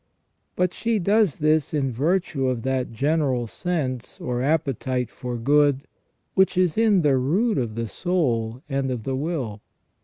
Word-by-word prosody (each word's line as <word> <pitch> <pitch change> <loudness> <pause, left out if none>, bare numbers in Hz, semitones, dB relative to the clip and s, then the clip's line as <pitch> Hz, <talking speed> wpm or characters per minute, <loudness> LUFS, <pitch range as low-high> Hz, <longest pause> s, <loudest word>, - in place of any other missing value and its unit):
But 180 -1 +1
she 230 -1 0
does 200 -3 +2
this 155 0 +1
in 135 -3 0
virtue 150 +1 0
of 125 -3 -1
that 130 -2 -1
general 135 0 0
sense 130 -3 -3
or 125 0 -2
appetite 135 -4 0
for 125 -1 -5
good 140 +2 +3 0.5
which 190 -1 +3
is 180 -3 +2
in 215 -5 +3
the 140 -3 +4
root 195 - +1
of 115 -4 -3
the 115 0 -2
soul 125 - -1
and 135 -2 -1
of 125 -3 -3
the 135 +2 -2
will. 130 -8 -3
140 Hz, 155 wpm, -24 LUFS, 125-175 Hz, 0.5 s, the